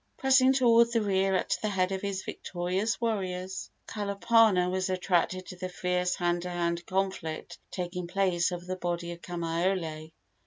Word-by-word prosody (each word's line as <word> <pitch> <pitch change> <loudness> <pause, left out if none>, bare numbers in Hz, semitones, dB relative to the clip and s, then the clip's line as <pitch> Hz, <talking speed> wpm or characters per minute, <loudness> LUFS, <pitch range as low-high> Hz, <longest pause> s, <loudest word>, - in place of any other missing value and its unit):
Pressing 265 -1 +5
toward 235 -3 +5
the 230 -1 +2
rear 195 -1 +2
at - - 0
the 215 - 0
head 185 -2 +1
of 190 -1 -2
his 200 -2 -3
victorious 185 +5 -2
warriors, 190 -5 -2 0.2
Kalapana 205 -2 +3
was 185 +1 -1
attracted 185 0 0
to 185 - -9
the 185 0 -5
fierce 180 0 0
hand 175 -1 0
to 180 - -5
hand 170 -1 -1
conflict 190 -4 -3
taking 180 -1 -4
place 180 -1 +1
over 175 0 -5
the 185 +1 -3
body 175 -1 -3
of 170 0 -9
Kamaiole. 165 -2 -2
185 Hz, 160 wpm, -29 LUFS, 175-195 Hz, 0.2 s, Pressing